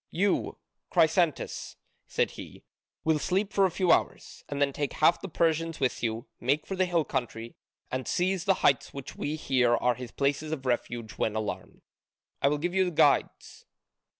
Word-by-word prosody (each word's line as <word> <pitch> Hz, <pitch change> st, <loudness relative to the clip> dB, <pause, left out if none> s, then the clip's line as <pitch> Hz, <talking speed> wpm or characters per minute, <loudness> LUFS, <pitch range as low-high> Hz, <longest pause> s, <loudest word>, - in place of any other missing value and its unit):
You, 195 Hz, +3 st, 0 dB, 0.3 s
Chrysantas," 165 Hz, -2 st, +1 dB, 0.3 s
said -, -, 0 dB
he, -, -, -11 dB, 0.4 s
"will 160 Hz, -1 st, +2 dB
sleep 195 Hz, +6 st, -1 dB
for 195 Hz, -, +4 dB
a -, -, +2 dB
few 180 Hz, 0 st, +1 dB
hours, -, -, 0 dB
and 140 Hz, -, -3 dB
then 140 Hz, -1 st, +2 dB
take 145 Hz, -1 st, -2 dB
half 165 Hz, +3 st, +3 dB
the 195 Hz, -, -6 dB
Persians 165 Hz, 0 st, 0 dB
with 130 Hz, -2 st, 0 dB
you, 115 Hz, +1 st, -2 dB
make 140 Hz, +5 st, 0 dB
for 195 Hz, -, -4 dB
the 185 Hz, 0 st, +2 dB
hill 170 Hz, -3 st, +1 dB
country, 115 Hz, -2 st, -4 dB, 0.4 s
and 130 Hz, -1 st, -3 dB
seize 185 Hz, 0 st, 0 dB
the 195 Hz, -, +4 dB
heights 135 Hz, -, +2 dB
which 140 Hz, -2 st, -7 dB
we 150 Hz, -, -3 dB
hear 125 Hz, -5 st, +2 dB
are 125 Hz, +1 st, +2 dB
his 125 Hz, 0 st, -8 dB
places 145 Hz, +4 st, -1 dB
of 140 Hz, -4 st, -4 dB
refuge 120 Hz, -2 st, -2 dB
when 110 Hz, -, 0 dB
alarmed. 110 Hz, -1 st, -5 dB, 0.6 s
I -, -, +4 dB
will 150 Hz, +1 st, +2 dB
give 175 Hz, +4 st, -2 dB
you 190 Hz, -1 st, +2 dB
guides. 165 Hz, -, +1 dB
150 Hz, 175 wpm, -28 LUFS, 125-175 Hz, 0.6 s, for